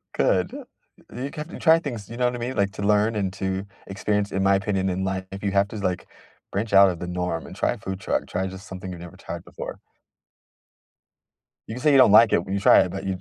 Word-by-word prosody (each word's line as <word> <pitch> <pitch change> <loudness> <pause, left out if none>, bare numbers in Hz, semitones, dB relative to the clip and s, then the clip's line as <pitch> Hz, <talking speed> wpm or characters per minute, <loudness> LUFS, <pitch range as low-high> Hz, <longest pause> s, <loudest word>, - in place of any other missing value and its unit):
Good, - - +2 0.6
you 130 +3 -4
can 150 +2 -7
you - - -8
try 165 -1 +5
things, 120 - -6
you 120 - -8
know 125 - +1
what 125 0 0
I - - -4
mean? 125 +2 -4
Like, 100 -1 +1
to - - -7
learn, 105 +2 +2
and 95 -3 -1
to 95 0 -3 0.2
experience 105 +1 -1
in 95 0 -1
my 100 0 +4
opinion 95 -1 0
in 95 +1 -2
life, 95 0 -2
if 100 +1 -8
you 100 - 0
have 100 0 +2
to, - - -9
like, 90 -3 -2 0.4
branch 100 +1 -3
out 100 0 +8
of 90 -2 -4
the 90 - -5
norm, 90 -2 -3
and - - -10
try - - 0
a - - -9
food 95 -1 -6
truck, - - -1
try 95 +1 -2
just 95 +2 -10
something 95 0 -7
you've 85 -1 -8
never 85 - -11
tried - - -7
before. - - -8 1.9
You 110 - -6
can 125 - -7
say 150 - +4
you 140 - +6
don't 130 -6 +7
like 110 +1 +8
it, 85 - +2
when 95 - -4
you 100 - -1
try - - +7
it, - - +2
but 95 +1 -5
you 95 -1 -2
100 Hz, 260 wpm, -24 LUFS, 95-110 Hz, 1.9 s, out